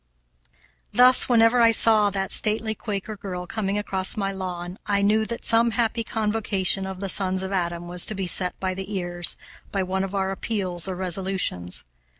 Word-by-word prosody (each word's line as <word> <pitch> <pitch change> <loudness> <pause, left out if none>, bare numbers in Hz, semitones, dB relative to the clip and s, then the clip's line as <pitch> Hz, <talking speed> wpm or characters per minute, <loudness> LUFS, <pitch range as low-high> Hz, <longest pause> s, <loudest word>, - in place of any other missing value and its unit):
Thus, 255 +2 +6
whenever 235 0 +3
I 230 - +5
saw 220 -2 +4
that 195 -1 -4
stately 220 0 +2
Quaker 210 0 -6
girl 185 -3 -7
coming 200 0 -3
across 190 -2 -2
my 195 -1 -2
lawn, 180 -1 -7
I 200 -1 0
knew 215 +2 +1
that 235 - -6
some 230 +1 +3
happy 230 -1 -1
convocation 210 -4 -2
of 190 0 -8
the 195 - -3
sons 190 0 +1
of 190 - -5
Adam 175 -2 -3
was 175 0 +4
to 215 - -2
be 195 -1 -4
set 180 +1 +2
by 185 -1 -3
the 190 +2 -8
ears, 175 -2 +3 0.3
by 195 -2 -2
one 190 +1 -3
of 195 +1 -6
our 190 -1 -2
appeals 190 -3 -1
or 190 - -4
resolutions. 185 - -2
195 Hz, 180 wpm, -23 LUFS, 185-215 Hz, 0.3 s, Thus